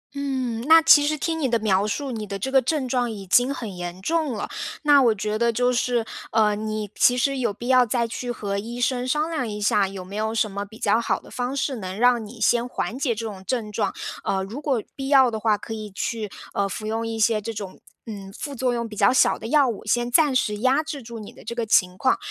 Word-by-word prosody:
嗯， 260 -5 -2
那 325 +1 +9
其 295 -2 +7
实 305 +1 0
听 325 +2 -2
你 275 -4 0
的 235 - +2
描 205 -2 +1
述， 275 +5 -3
你 215 -3 -5
的 200 0 -4
这 265 +7 -3
个 265 -1 +5
症 265 +1 -1
状 245 -1 0
已 205 -3 -7
经 245 +8 +3
很 225 -8 -5
严 175 0 -6
重 315 - 0
了。 215 - -4 0.4
那 290 -2 +6
我 235 -4 +4
觉 215 +1 -2
得 235 0 +3
就 245 +2 +1
是， 240 -1 0 0.3
呃， 210 -2 +3
你 215 -1 -4
其 245 - +4
实 275 +2 +1
有 235 -4 0
必 235 +4 -8
要 255 -1 +6
再 235 0 0
去 245 +2 -5
和 200 -4 -3
医 235 +4 -6
生 250 0 0
商 300 +5 0
量 265 -7 -2
一 210 0 -5
下， 205 -1 +2
有 190 -1 -8
没 195 +2 -9
有 220 +1 -1
什 215 -2 +1
么 200 +1 -4
比 215 +2 -14
较 220 +2 +2
好 - - 0
的 - - -16
方 250 +2 -3
式， 270 -1 -1
能 190 -2 -6
让 245 0 +3
你 220 +2 -11
先 240 +2 +2
缓 245 - -3
解 250 -5 0
这 225 +2 -5
种 200 -4 -7
症 215 +1 -2
状。 210 0 -1 0.3
呃， 190 -1 0
如 220 +9 -7
果 265 -7 0
必 270 -1 -5
要 265 -3 +5
的 220 - -3
话， 215 -1 +2
可 225 - -7
以 215 -1 -6
去， 210 +2 -3 0.2
呃， 200 0 0
服 215 - -6
用 225 +1 -2
一 225 0 -4
些 220 -1 +3
这 230 - -4
种， 205 -4 -7 0.3
嗯， 200 -3 -8
副 290 -2 -5
作 250 0 0
用 235 -1 -2
比 215 - -10
较 200 -1 +4
小 260 - +4
的 - - -6
药 285 +2 +4
物， 230 -4 -4
先 240 +3 0
暂 295 0 +4
时 210 -5 +1
压 260 +7 +2
制 300 -3 -6
住 235 -1 -9
你 210 - -9
的 - - -15
这 235 +2 -5
个 235 -1 -1
情 185 -4 +3
况。 260 - +2
230 Hz, 275 characters per minute, -24 LUFS, 210-255 Hz, 0.4 s, 那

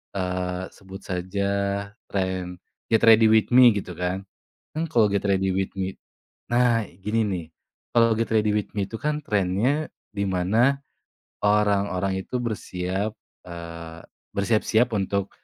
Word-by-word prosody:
eee, 90 -1 -2
sebut 95 0 -11
saja 95 +2 -2 0.6
tren 95 -2 -2 0.3
get 110 -1 +3
ready 115 0 +7
with 110 -1 +4
me 125 -1 +9
gitu 95 -3 -4
kan 90 +2 -2 0.5
kan 160 - 0
kalau 115 -3 +4
get 100 - +1
ready 95 -1 +2
with 95 0 -1
me— 95 0 -2 0.6
nah 120 -2 +3
gini 105 +5 -2
nih, 90 -5 -3 0.5
kalau 115 -1 +5
get 115 +1 -1
ready 105 -1 +2
with 105 - -1
me 100 - +1
itu 105 - -15
kan 150 0 0
trennya 105 +10 +1 0.3
di 100 - -1
mana, 110 +10 +2 0.7
orang-orang 100 -2 +2
itu - - -4
bersiap— 100 -2 -3 0.3
eee, 85 -1 -8 0.3
bersiap-siap 110 +3 +2
untuk, 100 0 -1
100 Hz, 135 wpm, -25 LUFS, 95-110 Hz, 0.7 s, me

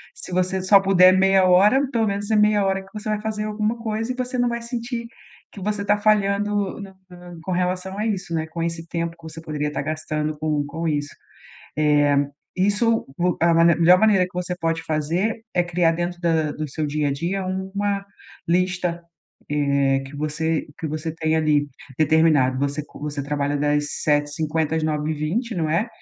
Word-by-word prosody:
Se - - -9
você 185 +1 0
só 195 +1 +6
puder 185 -1 +6
meia 190 0 +4
hora, 210 +10 +5
pelo 225 -3 +1
menos 200 +1 -3
é - - +3
meia 210 -1 +4
hora 195 0 0
que 195 - -18
você 210 0 -7
vai 210 0 -1
fazer 215 -1 -3
alguma 215 +2 -1
coisa 225 +1 -3
e - - -3
você 255 0 -3
não 245 0 +2
vai 235 0 -3
sentir 235 0 -4 0.4
que 200 - -11
você 205 +1 -2
tá 205 +1 +3
falhando 205 -1 +1
não 195 -1 -9 0.2
tá 175 0 -12
com 185 - -4
relação 185 +2 -1
a 215 - -1
isso, 195 -5 -3
né, 160 0 -1
com 165 +1 -6
esse 165 0 -3
tempo 170 0 -3
que 165 - -24
você 160 0 -9
poderia 150 -2 -3
tá - - -3
gastando 155 0 -3
com 150 -1 0
com 165 +3 -4
isso. 145 -1 -1 0.7
É, 145 -1 +3 0.4
isso 205 +4 +1
vo 180 0 +1
é - - +4
a 170 - +4
manem 165 0 +5
é - - -8
a - - -8
melhor 180 +2 +7
maneira 210 -4 +4
que 185 - -13
você 180 0 -3
pode 165 -1 -1
fazer, 170 +9 -1
é 180 - +3
criar 175 -1 +2
dentro 175 +1 -3
da 160 -3 +1
do 155 - -4
seu 155 +3 -3
dia 150 0 0
a - - -1
dia, 180 +6 -2
uma 195 +2 -2 0.4
lista, 175 -1 0 0.5
eh, 140 -2 +2
que 140 +2 -10
você 155 +2 -1
que 160 - -3
você 155 +1 -4
tenha 160 0 0
ali, 150 -2 +2 0.3
determinado. 155 -4 +3
Você 140 +1 -1
co - - -14
você 145 -1 -4
trabalha 145 0 -1
das 145 0 +1 0.2
7h50 150 +1 0
às 160 - -1
9h20, 155 - -1
não 160 -3 -1
é? 185 +9 +1
175 Hz, 200 wpm, -22 LUFS, 155-200 Hz, 0.7 s, melhor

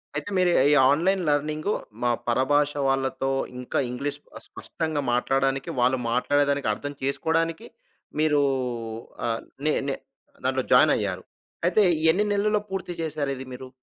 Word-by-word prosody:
అయితే, - - -3
మీరు 180 -1 +4
ఈ, - - +5
ఈ - - +5 0.2
ఆన్‌లైన్ 185 +6 +2
లెర్నింగు 155 +6 0 0.3
మా 120 - +3 0.2
పరభాష 145 +4 +2 0.2
వాళ్ళతో 135 0 0 0.3
ఇంకా 125 - -2
ఇంగ్లీష్ 140 +4 -4 0.2
పస్ - - -11
స్పష్టంగా 160 -3 -3
మాట్లాడానికి 135 +2 0
వాళ్ళు 125 +2 +3
మాట్లాడేదానికర్థం 140 0 +1
చేసుకోవడానికి 160 +4 -1 0.5
మీరు 150 -2 +3 0.8
ఆహ్, 115 -1 -1 0.2
నే 155 - +3
నే 135 - 0 0.5
దాంట్లో - - 0
జాయినయ్యారు. - - +3 0.4
అయితే 205 +4 +4 0.3
ఎన్ని 200 +6 +3
నెలలో 210 +1 +2
పూర్తి 190 -2 -4
జేశారిది 145 -4 -3
మీరు? 130 +1 -8
145 Hz, 125 wpm, -25 LUFS, 135-160 Hz, 0.8 s, ఈ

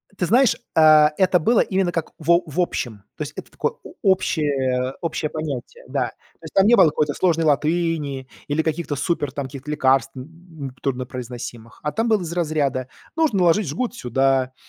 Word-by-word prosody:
Ты 180 - -1
знаешь, 240 +6 +4 0.2
э, 155 -1 +7
это 185 -1 +4
было 225 +8 +3
именно 190 -2 +1
как 165 -2 -3
в 160 +1 0
о 170 +1 +5
в 155 +1 -6
общем, 115 - -3
то - - -2
есть - - -8
это - - -9
такое - - -2
о - - -11
общее 140 -9 +1
общее 165 -2 -2
понятие, 155 - -6
да. - - 0
То - - -26
есть - - -10
там 195 - +5
не 235 +3 +6
было - - +7
какой-то 150 -1 +1
сложной 165 -2 +1
латыни 150 -3 0 0.2
или 145 +2 +1
каких-то 160 -1 -2
супер 145 0 -1
там 140 -1 -4
каких-то 135 +2 -9
лекарств, 135 -3 +2
м, 160 0 -9
труднопроизносимых. 125 -3 -5
А 150 - -1
там 225 +6 -1
было 220 -3 +2
из 170 -2 -5
разряда: 150 -7 -1 0.3
нужно 310 -12 +2
наложить 180 +2 +3
жгут 235 - -3
сюда, 135 - +1
155 Hz, 185 wpm, -22 LUFS, 135-175 Hz, 0.3 s, э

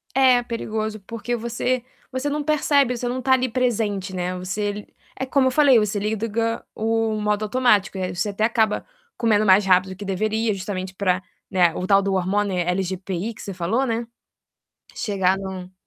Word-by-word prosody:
É 255 -2 +5
perigoso, 220 -2 -3
porque 230 +4 -4
você 235 +2 -1 0.3
você 260 +2 -2
não 295 +1 -2
percebe. 285 -4 +2
Você 245 - -3
não 255 +1 -2
tá 265 0 +3
ali 255 0 +2
presente, 215 -6 -1
né. 180 0 -2
Você 205 +3 -2
li 205 0 -8 0.3
é 265 - -1
como 265 0 +2
eu 260 - +2
falei, 275 -3 +5
você 210 -1 -1
liga 220 +2 -1
o 225 -1 0
modo 210 0 0
automático, 210 -4 +2
aí 185 -1 -2
você 180 +4 -1
até 205 +1 -2
acaba 220 -1 +1 0.3
comendo 215 -2 +2
mais 190 +1 +6
rápido 185 0 +3
que 200 +2 -8
deveria 215 +3 0
justamente 190 -1 -5
pra, 185 -1 0 0.3
né, 180 -4 +3
o 185 - -4
tal 195 0 +5
do 195 0 0
hormônio 190 +1 0
LGPI 185 +3 -2
que - - -12
você 200 - -6
falou, 190 +9 0
né, 235 -2 -1 0.8
que - - -12
chega 190 -2 +1
no 190 -1 -7
210 Hz, 180 wpm, -23 LUFS, 190-235 Hz, 0.8 s, mais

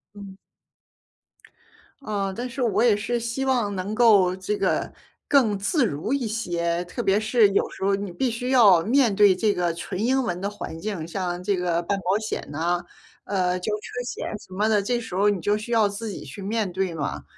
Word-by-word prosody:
嗯。 200 -2 -10 1.6
呃， 200 -6 -2
但 245 +5 -5
是 260 +2 -5
我 220 -4 +1
也 235 -3 +5
是 230 +4 -2
希 235 +3 -3
望 240 -7 0
能 190 +3 -3
够 210 -6 +5
这 190 +2 -3
个 - - 0 0.4
更 230 -8 +3
自 240 - +1
如 160 - -2
一 275 -3 0
些， 175 -6 -1
特 180 +7 -5
别 195 0 +3
是 220 -1 +4
有 200 - +1
时 - - -9
候 200 +1 +2
你 200 0 -2
必 240 +8 -1
须 245 +3 -3
要 205 -10 +6
面 235 +3 +3
对 200 -1 +5
这 210 +2 +1
个 175 -2 0
纯 180 +3 -5
英 260 +3 +2
文 180 -7 -3
的 200 +2 -2
环 205 -5 -7
境， 195 -4 -4
像 180 +1 -4
这 195 +1 0
个 175 -1 0
办 200 +3 -1
保 190 +2 +1
险 215 0 -4
呢， 170 +4 -1 0.4
呃， 180 -2 0
交 210 +4 -2
车 215 +4 -5
险 - - -5
什 185 - -14
么 210 +3 +1
的， 210 -2 +3
这 240 +5 0
时 225 -5 -9
候 200 +3 +3
你 200 -4 -1
就 205 +3 +1
需 225 +3 -5
要 220 -3 +4
自 205 +3 -6
己 200 - -7
去 145 +8 -9
面 210 0 -1
对 185 -1 -2
嘛， 140 - -4
205 Hz, 225 characters per minute, -24 LUFS, 180-225 Hz, 1.6 s, 要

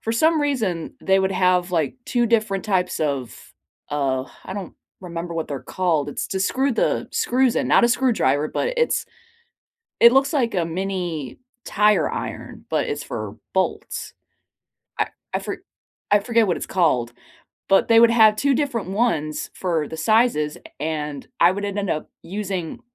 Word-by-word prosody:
for 225 - -2
some 315 +6 +3
reason, 220 - -1
they 190 0 +3
would 190 0 +1
have, 180 -1 +2
like, 165 - 0
2 240 -1 +1
different 215 -4 +1
types 185 -4 0
of, 140 -5 -3 0.4
uh, 135 -3 0 0.2
I - - -6
don't 195 -3 -6 0.3
remember 170 -2 -6
what 165 -1 -3
they're 140 -2 -5
called. 165 -6 0
It's 145 - -4
to 190 - -2
screw 265 +7 +1
the - - 0
screws 255 -1 +2
in. - - 0
Not - - +5
a - - +4
screwdriver, 220 - +2
but - - -2
it's 475 0 +1 0.9
It 235 - +8
looks 270 +2 +3
like 245 -7 +1
a 175 - +1
mini 175 -5 -4 0.3
tire 210 +1 +3
iron, - - -6
but - - 0
it's - - -3
for - - -6 0.2
bolts. - - -2 0.9
I - - +1 0.2
I - - +1
for - - -6 0.5
I 205 - +6
forget 230 0 +2
what 175 - +1
it's - - -5
called, 130 -10 +1 0.6
but 195 - +4
they 225 0 +6
would 235 0 +7
have 220 -2 +6
2 275 +4 +2
different 240 -9 -1
ones 175 -8 0
for 165 -5 -1
the 160 - -7
sizes, 160 -5 +2
a - - -16
and 150 -2 -4
I 170 - +7
would 200 +2 -4
ended 200 0 -2
up 155 - -3
using 195 +2 -4
190 Hz, 170 wpm, -22 LUFS, 160-230 Hz, 0.9 s, It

